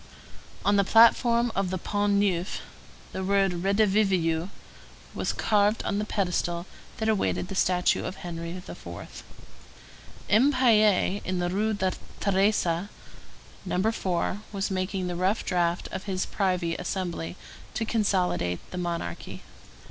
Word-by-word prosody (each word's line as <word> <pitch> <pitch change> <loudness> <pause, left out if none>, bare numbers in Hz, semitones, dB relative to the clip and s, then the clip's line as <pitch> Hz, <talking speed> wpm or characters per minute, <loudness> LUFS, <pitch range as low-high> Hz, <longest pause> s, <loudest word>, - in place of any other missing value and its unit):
On 205 0 +4
the 200 - +5
platform 235 +2 +5
of 195 -1 0
the 185 - -2
Pont 205 +2 0
Neuf, 195 -2 0 0.5
the 190 - -4
word 195 -2 +1
Redivivus 195 -4 +2 0.6
was - - -1
carved 210 0 +2
on 205 - -1
the 210 - -1
pedestal 180 -4 -1 0.3
that 220 - -1
awaited 205 -4 0
the - - -4
statue 180 -1 +2
of 185 - -4
Henry 170 -2 -6
IV. 180 +2 -9 1.0
M. 255 +8 +4
Piet, 215 -6 +4
in 185 0 -2
the 175 0 -1
Rue 215 +3 0
Thérèse, 190 -1 0 0.7
No. 190 +3 +1
4, 185 -1 -2
was 200 0 -2
making 185 0 -2
the 180 -1 -3
rough 190 +5 0
draft 175 -1 0
of 190 - -5
his 190 -2 -1
privy 180 -4 0
assembly 180 -2 -3 0.4
to 225 - -1
consolidate 185 - 0
the 180 - -4
monarchy. 170 - -4
190 Hz, 130 wpm, -27 LUFS, 180-205 Hz, 1.0 s, the